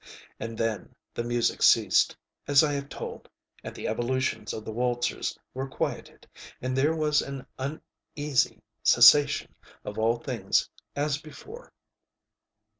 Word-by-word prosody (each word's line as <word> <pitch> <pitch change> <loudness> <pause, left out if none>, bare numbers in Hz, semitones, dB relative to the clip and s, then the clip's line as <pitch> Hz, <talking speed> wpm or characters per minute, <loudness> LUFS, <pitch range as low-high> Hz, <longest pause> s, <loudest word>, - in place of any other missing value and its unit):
And 115 0 -6
then 115 -4 -3 0.2
the 120 - -3
music 120 0 0
ceased, - - +4 0.3
as 145 +1 +6
I 150 -1 +1
have 140 0 -4
told; - - -8 0.3
and - - -7
the - - -5
evolutions 120 -1 -1
of 110 - -6
the 110 - -5
waltzers 120 +1 -1 0.2
were 135 +1 -4
quieted; - - -5 0.3
and 130 +1 -3
there 145 +5 +2
was 150 -1 +2
an 135 -2 -7
uneasy 140 +1 -2 0.2
cessation 145 -1 +6 0.3
of 105 +1 -5
all 115 +2 +2
things - - 0 0.3
as 145 0 0
before. 415 - -12
130 Hz, 130 wpm, -27 LUFS, 115-145 Hz, 0.3 s, as